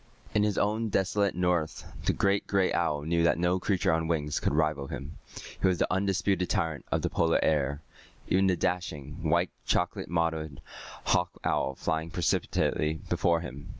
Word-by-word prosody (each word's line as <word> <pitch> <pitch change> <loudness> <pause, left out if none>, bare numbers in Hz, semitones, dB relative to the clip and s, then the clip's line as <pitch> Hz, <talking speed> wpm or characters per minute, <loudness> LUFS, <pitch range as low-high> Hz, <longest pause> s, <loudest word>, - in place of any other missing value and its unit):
In 105 - +3
his 105 -1 +1
own 110 +2 +1
desolate 100 0 +1
north 90 -3 0 0.2
the - - +4
great 100 0 +1
gray 95 -2 +2
owl 75 -4 0
knew 85 +2 +1
that 85 - +3
no 90 +2 +1
creature 90 -3 +1
on 80 0 0
wings 75 -3 0
could - - 0
rival 75 -3 +1
him. 70 +4 -7 0.4
He - - +4
was 90 -1 +2
the - - +1
undisputed 95 -1 +1
tyrant 80 -7 -1
of - - 0
the - - +1
Polar 80 0 +2
air, 70 -1 +1 0.4
even 95 +1 +3
the 95 - +3
dashing, 80 -6 -2
white - - +2 0.2
chocolate - - 0
mottled 80 -4 -1 0.4
hawk 90 0 +1
owl 70 - 0
flying 80 +3 -2
precipitately 80 -1 0
before 85 -1 +2
him. 70 +2 -8
85 Hz, 170 wpm, -29 LUFS, 75-95 Hz, 0.4 s, the